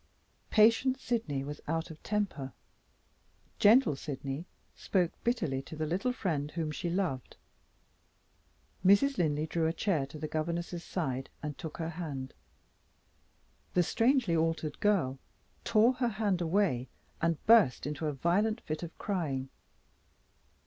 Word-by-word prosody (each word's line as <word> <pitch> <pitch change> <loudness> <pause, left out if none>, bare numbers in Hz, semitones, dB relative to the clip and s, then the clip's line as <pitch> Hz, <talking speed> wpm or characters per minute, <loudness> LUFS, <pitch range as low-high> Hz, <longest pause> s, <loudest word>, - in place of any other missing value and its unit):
Patient 230 +5 +4
Sydney 170 - -1
was 145 +1 -7
out 165 +1 -2
of 155 - -12
temper; 195 - -2 1.1
gentle 220 - +6
Sydney 140 +3 -5 0.3
spoke 180 -4 +1
bitterly 170 - 0
to 145 - -10
the 155 0 -2
little 185 +10 0
friend 160 - -2
whom 160 -1 -3
she 170 +3 -3
loved. 170 -8 -2 1.5
Mrs. 220 +9 +5
Linley 155 -2 +1
drew 160 0 0
a 160 - 0
chair 165 -9 0
to 155 - -10
the 155 +1 -4
governess's 170 +2 -3
side, 135 -7 -3
and 150 -1 -3
took 160 - -7
her 165 -1 -3
hand. 145 -6 -5 1.4
The 180 - +5
strangely 235 - +2
altered 160 -2 -1
girl 175 -11 +1 0.4
tore 230 +2 +4
her 250 -1 0
hand 205 -4 0
away 165 -8 +1 0.3
and 165 -1 +2
burst 220 - +5
into 150 +2 -3
a - - 0
violent 200 - +1
fit 155 0 -4
of 170 -1 -7
crying. 145 -10 -2
165 Hz, 135 wpm, -31 LUFS, 150-205 Hz, 1.5 s, gentle